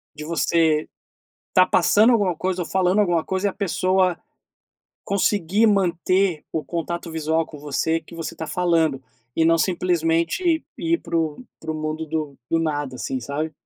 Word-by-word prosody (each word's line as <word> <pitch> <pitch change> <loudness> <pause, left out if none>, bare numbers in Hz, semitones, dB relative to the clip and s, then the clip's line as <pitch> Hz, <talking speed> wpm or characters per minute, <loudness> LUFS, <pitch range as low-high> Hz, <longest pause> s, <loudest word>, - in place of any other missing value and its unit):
De 150 - -7
você 160 -1 +1 0.6
estar 185 0 +4
passando 210 +7 +4
alguma 200 -6 +2
coisa 185 0 -1
ou - - -6
falando 190 +2 +2
alguma 175 -5 +2
coisa 190 +2 -1
e - - -1
a - - -11
pessoa 185 -2 +1 0.9
conseguir 200 +1 +2
manter 185 -3 +1
o 160 - -1
contato 170 0 -4
visual 160 0 0
com 150 - -11
você, 150 +3 0
que 170 - -14
você 165 -1 -6
tá 160 - -5
falando, 160 -4 +1 0.3
e 165 - +2
não 165 0 +4
simplesmente 175 - +1
ir 335 0 +1
pro 165 +6 -2 0.2
pro 160 -1 -4
mundo 155 +1 -3
do 155 -3 -4
do 165 - +3
nada, 145 -4 -2
assim, 130 +1 -3
sabe? 145 +6 -3
170 Hz, 160 wpm, -22 LUFS, 160-185 Hz, 0.9 s, estar